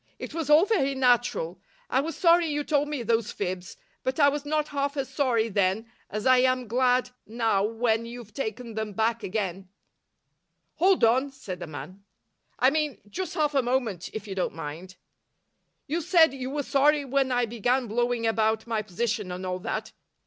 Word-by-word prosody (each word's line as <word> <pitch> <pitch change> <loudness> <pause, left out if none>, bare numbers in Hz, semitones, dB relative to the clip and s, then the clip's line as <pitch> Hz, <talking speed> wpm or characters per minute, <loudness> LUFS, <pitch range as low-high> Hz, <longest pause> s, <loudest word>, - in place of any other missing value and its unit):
"It - - -7
was 325 -3 -3
all 305 +5 +7
very 275 -11 +1
natural. 240 -9 +1 0.3
I 260 - +2
was 320 +3 -5
sorry 340 -1 +5
you 295 -1 -1
told 290 -1 +1
me 290 -5 -3
those 230 -1 +1
fibs, 185 -2 -4 0.2
but 260 +3 -2
I 285 -1 +7
was 290 0 -4
not 305 0 0
half 280 0 -2
as 270 -1 -2
sorry 240 -6 +1
then 200 +2 0 0.2
as 210 0 -4
I 255 -1 +6
am 255 -1 +2
glad 250 +2 +2 0.2
now 220 -3 +1
when 225 +1 0
you've 235 -3 -10
taken 230 -1 -4
them 220 -1 -4
back 225 +3 0
again." 190 -2 -3 1.1
"Hold 375 -3 +3
on," 255 +5 +4
said 205 -10 -8
the 175 - -6
man. 155 +7 -9 0.5
"I 260 - +4
mean, 300 -2 -1
just 370 - -4
half 300 -1 +1
a 275 - +3
moment, 240 -8 -1
if 215 -1 -7
you 195 - -4
don't 185 -4 -2
mind. 165 +4 -7 0.9
You 320 +4 -2
said 330 -3 +5
you 260 -1 -5
were 290 +1 -2
sorry 285 +2 +3
when 270 0 +1
I 245 -1 +2
began 245 +3 0
blowing 240 +1 0
about 220 0 +1
my 225 -2 -1
position 210 0 -2
and 180 +1 -5
all 185 0 -2
that. - - -4
245 Hz, 185 wpm, -27 LUFS, 215-280 Hz, 1.1 s, all